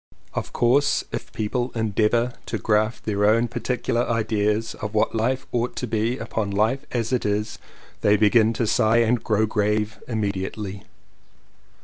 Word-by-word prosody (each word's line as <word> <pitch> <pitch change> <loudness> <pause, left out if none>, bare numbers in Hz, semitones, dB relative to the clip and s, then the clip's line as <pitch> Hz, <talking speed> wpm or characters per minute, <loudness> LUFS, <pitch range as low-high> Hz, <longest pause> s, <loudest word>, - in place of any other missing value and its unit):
Of - - -4
course 135 +4 +2
if - - -5
people 120 +3 -2
endeavour 115 +2 +1
to - - -2
graft 110 +1 0
their 105 -1 0
own 115 +3 +4
particular 120 0 -1
ideas 110 -1 0
of 105 0 -4
what 105 - +2
life 120 +4 0
ought 120 0 -1
to - - -3
be 115 +2 -1
upon 110 -3 -3
life 110 +8 0
as 120 0 -1
it 125 - +1
is, 105 +1 -2 0.4
they 105 0 +4
begin 110 +1 +4
to 115 - -1
sigh 110 0 +3
and 115 +1 +1
grow 110 0 +2
grave 105 0 -1
immediately. 100 -2 -3
110 Hz, 150 wpm, -23 LUFS, 105-120 Hz, 0.4 s, own